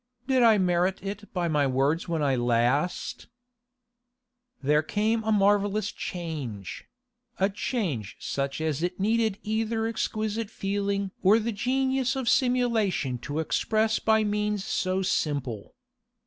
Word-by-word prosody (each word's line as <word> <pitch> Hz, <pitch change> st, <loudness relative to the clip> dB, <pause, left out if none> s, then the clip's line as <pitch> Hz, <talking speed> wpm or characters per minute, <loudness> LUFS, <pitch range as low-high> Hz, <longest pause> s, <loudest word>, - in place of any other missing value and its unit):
Did 260 Hz, -1 st, +2 dB
I 225 Hz, -2 st, +6 dB
merit 180 Hz, 0 st, +2 dB
it 200 Hz, +1 st, -6 dB
by 175 Hz, -2 st, -1 dB
my 150 Hz, -3 st, +2 dB
words 135 Hz, +5 st, +1 dB
when 165 Hz, -3 st, -1 dB
I 135 Hz, -2 st, +2 dB
last—' 120 Hz, +7 st, 0 dB, 1.4 s
There 150 Hz, +2 st, +3 dB
came 220 Hz, +7 st, 0 dB
a 220 Hz, -, 0 dB
marvellous 205 Hz, 0 st, +2 dB
change—a 190 Hz, -, -5 dB
change 185 Hz, -, -3 dB
such 140 Hz, +1 st, -3 dB
as 155 Hz, -2 st, -1 dB
it 180 Hz, +2 st, -2 dB
needed 220 Hz, 0 st, +1 dB
either 220 Hz, +1 st, -1 dB
exquisite 220 Hz, -1 st, -2 dB
feeling 200 Hz, -1 st, -2 dB
or 200 Hz, +3 st, +6 dB
the 230 Hz, +1 st, -1 dB
genius 260 Hz, +3 st, 0 dB
of 265 Hz, -3 st, -3 dB
simulation 230 Hz, -, +1 dB
to 145 Hz, +4 st, -5 dB
express 215 Hz, +7 st, +1 dB
by 220 Hz, 0 st, +3 dB
means 210 Hz, -1 st, -1 dB
so 185 Hz, -1 st, 0 dB
simple. 140 Hz, -, -2 dB
200 Hz, 125 wpm, -27 LUFS, 155-220 Hz, 1.4 s, I